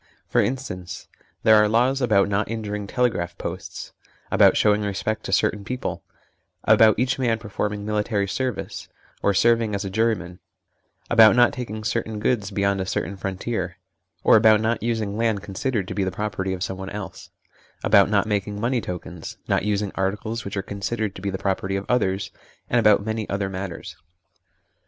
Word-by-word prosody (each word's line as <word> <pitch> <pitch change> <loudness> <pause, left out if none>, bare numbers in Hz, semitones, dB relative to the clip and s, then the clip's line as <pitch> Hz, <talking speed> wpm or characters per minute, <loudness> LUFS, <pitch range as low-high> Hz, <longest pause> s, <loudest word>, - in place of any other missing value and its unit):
For - - +3
instance, 95 -9 -4 0.4
there 110 - +6
are 105 0 +4
laws 125 +5 +2
about 105 -6 +3
not 100 +1 0
injuring 105 -2 -4
telegraph 100 -9 -1
posts; 90 0 -6 0.4
about - - +5
showing 105 0 +3
respect 105 +2 -2
to - - -4
certain 105 -1 +1
people; 125 +4 -4 0.6
about 110 -2 +5
each 130 +2 0
man 120 -3 +1
performing 105 -1 -4
military 105 -1 0
service, 125 +3 -3 0.3
1 - - +1
or - - +3
serving 115 -1 +3
as 100 0 -3
a 95 - -4
juryman; 95 -5 -1 0.7
about 110 -2 +7
not 120 +1 +5
taking 110 -5 -5
certain 110 -1 -2
goods 105 -3 0
beyond 100 -1 0
a - - -2
certain 95 +1 -2
frontier; 95 -1 -4 0.5
or - - +7
about 110 -1 +6
not 110 +1 0
using 110 -3 -2
land 110 -3 0
considered 105 +1 -2
to - - -4
be 100 - 0
the 95 - 0
property 95 0 -3
of 90 -1 -3
someone 95 0 -5
else; 105 -2 -8 0.5
about - - +5
not - - +2
making 105 -1 -2
money 120 +2 0
tokens; 90 -3 -7
not - - +1
using 105 -1 0
articles 105 +4 -2
which 100 +1 -5
are 95 - -1
considered 100 +1 -3
to 95 - -10
be 100 - -2
the 95 - -3
property 95 0 -1
of 100 0 -3
others, 95 -5 0 0.4
and 120 - +4
about 105 -2 +4
many 110 -1 -3
other 100 -1 -1
matters. 95 -2 -6
105 Hz, 175 wpm, -23 LUFS, 95-115 Hz, 0.7 s, about